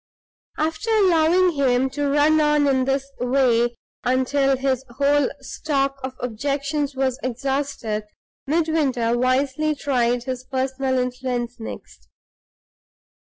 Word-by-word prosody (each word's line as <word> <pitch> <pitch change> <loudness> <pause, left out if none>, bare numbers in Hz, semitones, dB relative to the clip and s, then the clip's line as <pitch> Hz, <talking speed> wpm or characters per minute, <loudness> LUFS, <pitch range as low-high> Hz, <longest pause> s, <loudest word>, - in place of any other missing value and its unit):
After 325 +8 -2
allowing 365 -4 +4
him 265 -4 +2
to 290 +1 -1
run 300 +2 +4
on 295 -1 +3
in 260 -2 +2
this 270 0 0
way 245 -2 +2 0.3
until 265 +2 +2
his 265 -1 0
whole 285 +1 +3
stock 275 -3 -2
of 260 0 -4
objections 280 +4 -2
was 265 -1 0
exhausted, 255 -4 -2 0.4
Midwinter 290 -7 +1
wisely 270 +5 +1
tried 245 -4 0
his 255 0 -4
personal 260 0 -1
influence 250 -1 -2
next. 225 - -10
270 Hz, 110 wpm, -22 LUFS, 255-290 Hz, 0.4 s, allowing